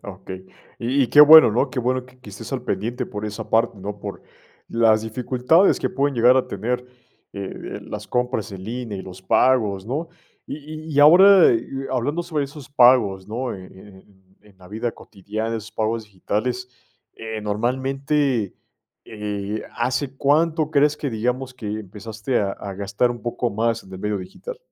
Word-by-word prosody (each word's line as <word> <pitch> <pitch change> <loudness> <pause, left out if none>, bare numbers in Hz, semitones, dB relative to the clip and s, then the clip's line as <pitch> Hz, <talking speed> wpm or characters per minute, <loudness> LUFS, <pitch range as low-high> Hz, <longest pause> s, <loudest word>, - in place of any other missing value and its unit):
Okey, 95 -1 -9 0.3
y 130 +4 +1
y - - +2
qué 145 - +7
bueno, 155 -2 +10
¿no?, 120 +6 0
qué 135 - -4
bueno 125 +1 0
que 130 0 -21
que 105 - -12
estés 100 - -9
al - - -2
pendiente 115 +5 -3
por 105 0 -6
esa 105 -1 -6
parte, 115 -1 +1
¿no?, 100 +2 -6
por 100 -1 -7 0.5
las 110 -2 +3
dificultades 125 - +2
que - - 0
pueden 145 -6 0
llegar 125 +2 +5
a 130 - +1
tener, 115 +6 -2 0.5
eh 100 -1 -5 0.3
eh, - - -9
las - - -7
compras 125 -4 -1
en 95 -1 -8
línea 115 -2 -5
y - - -6
los 95 0 -11
pagos, 105 -3 +2
¿no?, 150 +7 -3 0.4
y - - -5 0.3
y-y 145 - -1
ahora, 185 +5 +8
eh, 115 - +1
y 135 0 -5
hablando 145 +7 -1
sobre 155 -4 -2
esos 140 -1 -11
pagos, 120 -8 +4
¿no?, 120 +3 -3
en 95 -1 -11
en 95 -1 -17 0.2
en 105 -2 -22
la 90 -1 -15
vida 115 +3 -3
cotidiana, 110 +3 -5
esos 110 0 -9
pagos 110 +1 -1
digitales, 110 +5 -3 0.5
eh, 110 -1 -6
normalmente, 130 +2 -1 0.5
eh, 105 -1 -5
¿hace 130 +3 -2
cuánto 155 +2 +2
crees 150 0 +3
que 140 - -3
digamos 125 +4 -2
que 125 -4 -9
empezaste 110 +3 -4
a 100 -1 -1
a 100 -1 -7
gastar 100 +5 0
un 120 - -6
poco 120 0 -2
más 115 +2 -1
en 95 - -15
el 95 - -7
medio 105 0 -2
digital? 450 - -9
115 Hz, 180 wpm, -22 LUFS, 105-130 Hz, 0.5 s, bueno